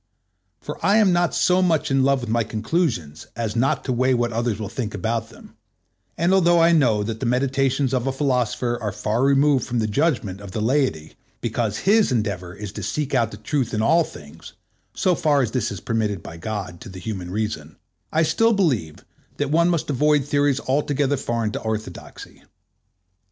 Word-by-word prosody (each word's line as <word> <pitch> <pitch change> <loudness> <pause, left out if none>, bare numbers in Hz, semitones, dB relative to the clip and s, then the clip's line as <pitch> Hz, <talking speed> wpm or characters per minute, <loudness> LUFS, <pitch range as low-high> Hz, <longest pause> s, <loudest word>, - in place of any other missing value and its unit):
For - - -8
I 200 +2 +4
am 205 -5 +4
not 175 0 +1
so 180 +1 +3
much 160 -4 +1
in 135 -1 +3
love 135 -1 +2
with 120 - -6
my 115 0 +2
conclusions 110 - -2
as 115 -1 -3
not 120 +4 +1
to 130 - 0
weigh 130 +1 +2
what 120 -1 0
others 115 -1 -1
will 105 - -4
think 105 0 -4
about 115 +3 -2
them, 110 - -16 0.6
and 170 +3 +2
although 175 -2 +4
I 165 +1 +5
know 120 -10 +3
that 110 +1 -4
the 125 - -2
meditations 135 +1 +1
of 130 0 0
a - - +1
philosopher 125 -3 -1
are 105 -2 -2
far 105 +4 -1
removed 140 0 +3
from 125 - -2
the 110 - +1
judgment 110 - -1
of 100 -2 -10
the - - -2
laity, 110 - 0 0.3
because 115 -2 -2
his 205 - +3
endeavor 100 -6 -2
is 105 -1 -7
to - - -7
seek 150 -2 -3
out 120 -4 +2
the 105 - -10
truth 120 +2 -2
in 110 - 0
all 165 +8 +4
things, 75 - -12 0.4
so 185 - +2
far 145 -4 +2
as 115 - -2
this 120 -2 -1
is - - -5
permitted 110 -4 -2
by 85 - -9
God 90 -1 -5
to - - -9
the 95 - -10
human 90 -2 -5
reason, 95 -7 -4 0.4
I 160 +1 +2
still 225 +8 +3
believe 130 - -1 0.3
that 145 -1 -1
one 170 +2 +3
must 165 -4 -1
avoid 150 +1 +2
theories 145 -1 +1
altogether 145 +1 0
foreign 115 -5 -2
to - - -5
orthodoxy. 110 -4 -6
120 Hz, 195 wpm, -22 LUFS, 105-145 Hz, 0.6 s, I